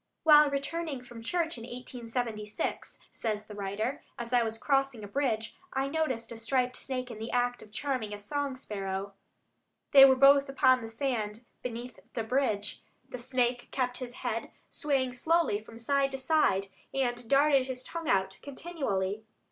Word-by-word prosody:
"While 300 -2 +8
returning 280 0 -3
from 240 -2 -10
church 325 +3 -1
in - - -9
1876," 235 -1 -4
says 215 -2 -3
the 210 - -10
writer, 205 +6 -3 0.2
"as 235 +1 -5
I 245 - +5
was 225 -1 -2
crossing 270 -3 +1
a - - -6
bridge... 225 -2 -1 0.2
I 270 +1 0
noticed 280 -7 -1
a 230 - -6
striped 250 +2 0
snake 255 -2 -4
in 220 - -8
the 225 +1 -4
act 245 0 0
of 210 - -14
charming 250 -2 -2
a 205 - -4
song 275 +6 -2
sparrow. 195 -5 -4 0.8
They 275 -1 +10
were 265 -1 +8
both 275 +1 +6
upon 260 -2 +4
the 225 - -6
sand 225 -2 -2 0.2
beneath 245 0 -6 0.2
the 230 - -1
bridge. 220 -4 0 0.3
The 250 - -6
snake 245 -1 0
kept 250 -2 -1
his 250 -1 -6
head 230 -1 -2 0.2
swaying 265 -4 0
slowly 315 -5 +2
from 225 +1 -12
side 275 +4 +2
to - - -1
side, 260 -9 +2 0.2
and 245 -3 -1
darted 275 -1 +4
his 255 -1 -4
tongue 330 +2 -5
out 190 0 +1
continually. 240 - -3
250 Hz, 165 wpm, -30 LUFS, 225-275 Hz, 0.8 s, They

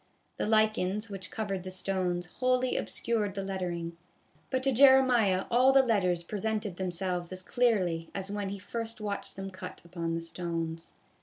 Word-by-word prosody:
The - - -1
lichens 215 -1 +2
which 190 -1 -6
covered 200 -4 -3
the 185 - -6
stones 185 -1 -1
wholly 255 0 +2
obscured 215 -4 -1
the 195 - -2
lettering, 175 -3 -3 0.5
but 260 0 0
to 270 - +3
Jeremiah 250 -7 +5
all 250 +3 +6
the 270 0 +6
letters 185 -8 +2
presented 210 0 -2
themselves 180 -1 -2
as 185 0 -6
clearly 185 -9 +1
as 195 0 -4
when 205 -1 -2
he 200 - -4
first 230 +3 -4
watched 205 -1 -4
them 195 0 -6
cut 185 - -9
upon 170 -1 -3
the 165 - -2
stones. 165 -1 -4
195 Hz, 160 wpm, -30 LUFS, 180-225 Hz, 0.5 s, all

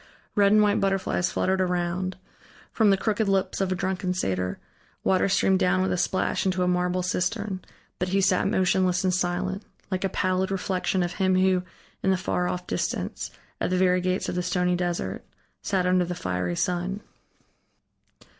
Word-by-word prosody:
Red 200 -2 +4
and 215 0 +6
white 205 -1 +3
butterflies 195 -2 0
fluttered 190 0 +1
around; 180 +1 -1 0.5
from 220 -3 +3
the 195 - +4
crooked 215 +1 0
lips 195 0 0
of 190 -1 0
a - - +1
drunken 185 0 -2
satyr, 90 - -1 0.5
water 190 +1 +2
streamed 190 0 +3
down 185 0 +2
with 190 - 0
a - - +1
splash 185 - 0
into 185 -1 +1
a - - +1
marble 180 0 +1
cistern, 185 +2 -1 0.4
but 180 - 0
he 195 +2 +1
sat 190 -1 +3
motionless 185 -1 +2
and 185 -1 +2
silent, 185 +2 -1 0.3
like 185 0 -1
a 195 - +1
pallid 185 0 0
reflection 190 -1 0
of 175 0 -3
him 185 -1 +2
who, 185 0 +3 0.4
in 190 - +1
the 190 - +3
far 180 -1 -1
off 180 0 -4
distance, - - -3 0.3
at - - 0
the 185 - +1
very 180 0 +3
gates 185 +1 -1
of - - -2
the 180 - -1
stony 180 0 +1
desert, 175 - -2 0.4
sat 190 -2 0
under 180 0 +3
the 180 +1 -4
fiery 90 - -2
sun. 180 - -1
185 Hz, 180 wpm, -26 LUFS, 180-190 Hz, 0.5 s, and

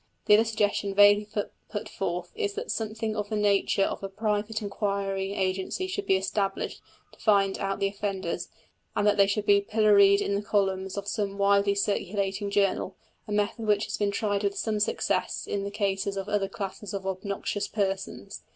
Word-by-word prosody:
The - - +5
other 220 +2 +6
suggestion 205 -2 0
vaguely 205 +1 +6 0.4
put 210 -1 -4
forth 180 -2 -3
is 415 -2 -2
that 450 +3 -3
something 220 0 -2
of 210 -1 -3
the 215 - -2
nature 200 -1 +2
of - - -2
a 195 - -4
private 215 +1 -1
inquiry 200 -2 -2
agency 190 - -1
should 390 +2 -4
be - - +4
established 195 +1 -2 0.3
to - - -20
find 200 -3 +3
out 195 0 -2
the 195 - +1
offenders, 195 -3 -3 0.5
and 205 - +1
that 210 0 +4
they 200 -1 +6
should 205 +1 -1
be 200 0 +5
pilloried 200 -1 +5
in 200 - -1
the 200 - 0
columns 195 -2 0
of 200 0 -4
some 205 -1 -2
widely 200 0 +3
circulating 200 0 -1
journal, 200 -1 +1 0.3
a - - -7
method 210 +2 -1
which 210 0 +3
has - - -4
been 205 -1 +1
tried 205 0 -1
with 200 0 0
some 215 -2 -1
success 210 - 0
in 200 -1 -2
the - - -2
cases 200 -1 -1
of 195 0 -4
other 205 -2 0
classes 195 +1 -5
of 195 -1 -5
obnoxious 200 +1 -3
persons. 195 -2 -3
200 Hz, 185 wpm, -27 LUFS, 195-210 Hz, 0.5 s, other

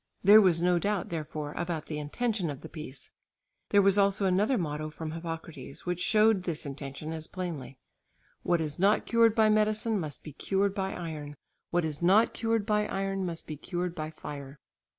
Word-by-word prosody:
There 210 +3 +9
was 175 -4 +3
no 180 -1 +3
doubt 200 0 -1
therefore 155 -2 -4
about 170 -3 -3
the 150 -1 -4
intention 195 +4 -1
of 140 -2 -6
the 160 - -9
piece. 145 -4 -8 0.6
There 200 -1 +5
was 195 +1 +5
also 200 0 +3
another 205 +7 +2
motto 155 -3 -3
from 155 +1 -6
Hippocrates 165 -4 -7
which 180 -1 -2
showed 215 0 +4
this 170 -3 -4
intention 140 +2 -6
as 160 -1 -5
plainly; 165 -8 -6 0.6
"What 175 -2 +1
is 150 -1 -4
not 200 +3 +3
cured 230 -1 +4
by 220 -2 +5
medicine 215 0 +2
must 150 -5 -5
be 150 - -9
cured 195 +5 0
by 195 -1 -2
iron; 155 -4 -6 0.3
what 175 -1 +1
is 155 -1 -3
not 195 +6 +5
cured 225 -2 0
by 210 -1 +1
iron 195 -1 -2
must 170 -1 -5
be 155 - -6
cured 175 +3 -3
by 155 -2 -4
fire." 140 -2 -8
175 Hz, 185 wpm, -29 LUFS, 155-200 Hz, 0.6 s, There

